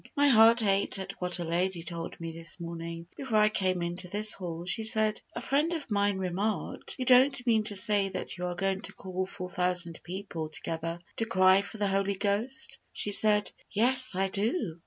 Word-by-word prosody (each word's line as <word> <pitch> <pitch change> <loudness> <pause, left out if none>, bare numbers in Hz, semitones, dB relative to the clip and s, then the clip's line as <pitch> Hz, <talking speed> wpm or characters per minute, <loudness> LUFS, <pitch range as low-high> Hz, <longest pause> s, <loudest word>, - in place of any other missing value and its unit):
My 285 0 +4
heart 230 -1 +6
ached 200 0 +1
at 190 0 -5
what 180 0 0
a 175 - -4
lady 170 +1 -1
told 165 -1 -5
me 165 -1 -5
this 165 +1 -8
morning, 170 0 -6
before 260 -6 -1
I 210 0 +5
came 185 -4 -1
into 175 +1 -3
this 210 +3 +2
hall. 170 -2 -6
She 220 +5 +1
said, 215 -1 +3
"A - - -4
friend 295 +5 +1
of 300 -8 -5
mine 200 -1 +1
remarked, 190 +3 -3
'You 255 - -3
don't 255 0 +4
mean 220 -3 +2
to 210 -2 -1
say 200 0 +3
that 185 -1 -5
you 180 0 -4
are 175 - -4
going 195 +1 -1
to - - -6
call 185 0 -4
four 185 -2 -6
thousand 180 -2 0
people 175 -3 -6
together 165 +2 -4 0.2
to 225 - 0
cry 185 -2 +4
for 200 +2 -9
the 205 - 0
Holy 195 0 0
Ghost?' 205 +6 -3
She 205 - -4
said, 210 0 +3 0.2
'Yes, 255 +1 +5
I 195 +1 +1
do.' 200 - -2
195 Hz, 200 wpm, -29 LUFS, 180-215 Hz, 0.2 s, heart